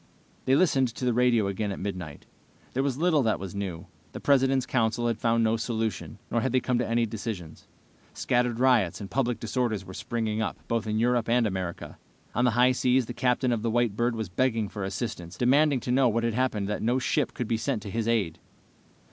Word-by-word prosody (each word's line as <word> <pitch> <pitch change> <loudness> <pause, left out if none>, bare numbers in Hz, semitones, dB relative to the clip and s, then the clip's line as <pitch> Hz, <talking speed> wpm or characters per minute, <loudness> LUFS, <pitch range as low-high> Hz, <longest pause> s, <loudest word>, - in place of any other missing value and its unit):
They 130 - +4
listened 140 -6 +3
to 125 - -4
the 125 - +2
radio 120 -3 +3
again 100 +1 -2
at - - -5
midnight. 90 -7 -6 0.5
There 130 - +1
was 135 -2 -1
little 160 -2 +3
that 110 -4 +1
was 95 -2 -6
new. 95 -3 -5 0.3
The - - -6
President's 135 -2 +3
council 120 -1 0
had 115 -2 0
found 115 0 +2
no 110 0 +2
solution, 115 -1 -3
nor 120 - +1
had 130 +1 -1
they 130 - +4
come 125 -1 0
to 120 - -1
any 115 0 +2
decisions. 105 -7 -6 0.5
Scattered 120 -1 0
riots 125 -9 +3
and 100 -2 -8
public 125 -3 0
disorders 115 -4 -1
were 95 - -9
springing 110 +1 -2
up, - - -2
both 115 -2 -1
in 105 0 0
Europe 120 0 +1
and 120 0 +3
America. 95 -4 -4 0.3
On 120 - +2
the - - +5
high 125 +1 +6
seas, 125 0 +2
the 120 - -6
captain 125 +1 +1
of 115 -2 0
the 115 - -1
White 120 -2 +1
Bird 120 +1 0
was 110 -2 -3
begging 110 +2 0
for 100 - -5
assistance, 95 -3 -5
demanding 140 +3 +3
to 125 - -3
know 130 0 +4
what 115 +1 0
had 115 -1 0
happened 110 -5 0
that 105 - -3
no 120 +3 +1
ship 130 - 0
could 120 - -3
be 115 - +1
sent 115 -2 -2
to 100 - -7
his 115 +1 -2
aid. 105 -9 0
115 Hz, 220 wpm, -27 LUFS, 105-125 Hz, 0.5 s, high